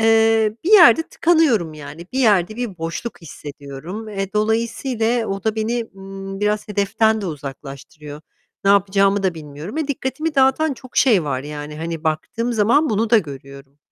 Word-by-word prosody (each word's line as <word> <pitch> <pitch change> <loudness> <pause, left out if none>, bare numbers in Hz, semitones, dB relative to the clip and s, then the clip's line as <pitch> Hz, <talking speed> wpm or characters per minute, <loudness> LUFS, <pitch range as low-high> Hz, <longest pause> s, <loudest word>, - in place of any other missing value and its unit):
eee, 225 -1 +3
bir 385 - 0
yerde 340 -5 +8
tıkanıyorum, 285 - +2
yani 155 +3 -10
bir 265 - -2
yerde 215 -4 +3
bir 225 -8 -5
boşluk 165 +8 -5
hissediyorum. 150 +7 -8
E, 195 -2 -4
dolayısıyla 225 +2 0
o 195 +1 -4
da 220 -1 +1
beni, 230 +2 -1
ımm, 195 0 -8
biraz 210 0 0
hedeften 215 +2 +1
de 195 - -4
uzaklaştırıyor. 145 0 -8 0.4
Ne 195 - +4
yapacağımı 195 0 +3
da 185 -3 0
bilmiyorum 155 - -8
ve 310 -2 -2
dikkatimi 295 +3 -3
dağıtan 270 +2 +3
çok 255 0 -15
şey 215 - +4
var, 130 -3 -2
yani 150 0 -7
hani, 165 0 -5
baktığım 230 +10 -2
zaman 235 +8 +3
bunu 220 +1 0
da 230 - +7
görüyorum. 140 -3 -9
205 Hz, 160 wpm, -20 LUFS, 160-230 Hz, 0.4 s, yerde